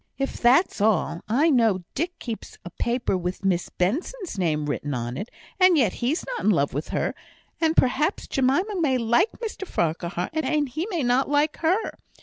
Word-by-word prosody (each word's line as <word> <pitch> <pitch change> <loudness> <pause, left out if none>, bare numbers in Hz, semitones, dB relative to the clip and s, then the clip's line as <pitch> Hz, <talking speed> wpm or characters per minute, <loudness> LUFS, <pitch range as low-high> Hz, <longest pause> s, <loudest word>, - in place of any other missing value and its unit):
"If 275 0 -3
that's 250 - +4
all, 200 -5 +1
I 290 +9 +3
know 225 -8 +3
Dick 345 +4 -3
keeps 230 -3 -7
a 175 - -7
paper 240 +2 -1
with 180 +2 -4
Miss 180 -2 +1
Benson's 325 - -2
name 155 -6 0
written 145 -1 -3
on 120 0 -3
it, 205 - -5 0.3
and 370 -2 +6
yet 230 -10 +3
he's 265 +8 0
not - - -4
in - - +3
love - - +2
with - - -3
her; - - -1 0.5
and 320 0 +2
perhaps 300 +8 +2
Jemima 335 +9 +1
may 270 -5 +2
like 240 - +2
Mr 430 -4 -6
Farquhar, 170 - -2
and 300 -2 0
he 315 +9 -3
may 345 -8 -1
not 250 +3 +2
like 295 +1 +2
her. 365 +7 0
255 Hz, 180 wpm, -24 LUFS, -, 0.5 s, and